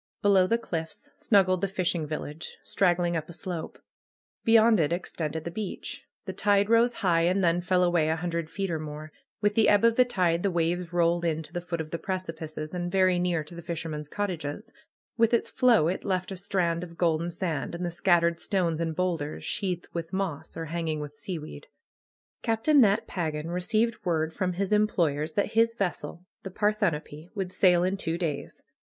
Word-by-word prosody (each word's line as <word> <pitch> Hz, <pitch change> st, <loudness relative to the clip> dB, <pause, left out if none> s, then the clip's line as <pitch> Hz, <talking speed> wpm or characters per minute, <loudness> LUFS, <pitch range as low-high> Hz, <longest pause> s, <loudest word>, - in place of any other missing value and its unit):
Below 195 Hz, -2 st, +5 dB
the 230 Hz, -, +2 dB
cliffs 165 Hz, -8 st, -6 dB
snuggled 185 Hz, -4 st, +3 dB
the 200 Hz, -, +1 dB
fishing 180 Hz, -4 st, -1 dB
village, 155 Hz, +1 st, -6 dB
strag 180 Hz, -3 st, +3 dB
gling 175 Hz, -1 st, 0 dB
up 160 Hz, 0 st, -3 dB
a -, -, -8 dB
slope. 170 Hz, -1 st, -5 dB, 0.7 s
Beyond 225 Hz, -1 st, +5 dB
it 150 Hz, -1 st, +2 dB
extended 160 Hz, -3 st, -3 dB
the 170 Hz, -, -5 dB
beach. 205 Hz, +1 st, -6 dB, 0.2 s
The -, -, -4 dB
tide 205 Hz, +1 st, +2 dB
rose 235 Hz, +1 st, +4 dB
high 170 Hz, -2 st, +4 dB
and 185 Hz, +2 st, +2 dB
then 170 Hz, 0 st, +3 dB
fell 180 Hz, +1 st, +2 dB
away 175 Hz, -3 st, +2 dB
a 160 Hz, -, +2 dB
hundred 170 Hz, -1 st, -3 dB
feet 195 Hz, 0 st, -3 dB
or 160 Hz, -, -1 dB
more. 155 Hz, 0 st, -7 dB, 0.3 s
With 205 Hz, 0 st, +2 dB
the 220 Hz, +1 st, +4 dB
ebb 205 Hz, +2 st, +5 dB
of 230 Hz, 0 st, +4 dB
the 250 Hz, -, +7 dB
tide 180 Hz, -8 st, +1 dB
the 200 Hz, -, +1 dB
waves 175 Hz, 0 st, -1 dB
rolled 170 Hz, 0 st, +2 dB
in 160 Hz, -1 st, 0 dB
to -, -, -13 dB
the 175 Hz, -, -2 dB
foot 175 Hz, -1 st, -4 dB
of 155 Hz, -1 st, -5 dB
the 170 Hz, -, -3 dB
precipices, 160 Hz, -4 st, -5 dB
and 175 Hz, -1 st, -3 dB
very 185 Hz, -1 st, +3 dB
near 175 Hz, -3 st, 0 dB
to 150 Hz, -, -12 dB
the 170 Hz, -, -8 dB
fisher 170 Hz, -1 st, -4 dB
men's 150 Hz, -1 st, -5 dB
cottages. 170 Hz, -8 st, -4 dB, 0.4 s
With 230 Hz, +1 st, +4 dB
its -, -, -1 dB
flow 235 Hz, -11 st, +4 dB
it 180 Hz, -, -2 dB
left 185 Hz, -1 st, -1 dB
a -, -, -3 dB
strand 180 Hz, -3 st, -1 dB
of 170 Hz, -1 st, -10 dB
golden 170 Hz, -1 st, +1 dB
sand, 170 Hz, -3 st, -3 dB
and 175 Hz, +1 st, -3 dB
the 175 Hz, -, -2 dB
scattered 170 Hz, 0 st, +2 dB
stones 170 Hz, -6 st, 0 dB
and 165 Hz, -1 st, -2 dB
boulders 165 Hz, -5 st, -2 dB
sheathed 185 Hz, -4 st, -2 dB
with 170 Hz, -1 st, -4 dB
moss 170 Hz, -5 st, -3 dB
or 165 Hz, -, -3 dB
hanging 160 Hz, -1 st, -2 dB
with 150 Hz, 0 st, -8 dB
seaweed. 155 Hz, -, -7 dB, 0.7 s
Captain 230 Hz, +6 st, +3 dB
Nat 215 Hz, 0 st, +3 dB
Pagan 160 Hz, -4 st, -3 dB
received 220 Hz, +5 st, 0 dB
word 160 Hz, -2 st, 0 dB
from 185 Hz, -1 st, -1 dB
his 195 Hz, +3 st, -1 dB
employ 200 Hz, -8 st, +2 dB
ers 155 Hz, +1 st, -3 dB
that 205 Hz, 0 st, 0 dB
his 230 Hz, 0 st, +3 dB
vessel, 180 Hz, -4 st, -3 dB, 0.2 s
the 190 Hz, -, -6 dB
'^Parthenope," 180 Hz, -7 st, -1 dB
would 190 Hz, -3 st, -3 dB
sail 180 Hz, -2 st, +4 dB
in 190 Hz, +2 st, 0 dB
two 165 Hz, -3 st, -2 dB
days. 160 Hz, -5 st, -4 dB
175 Hz, 200 wpm, -27 LUFS, 165-195 Hz, 0.7 s, the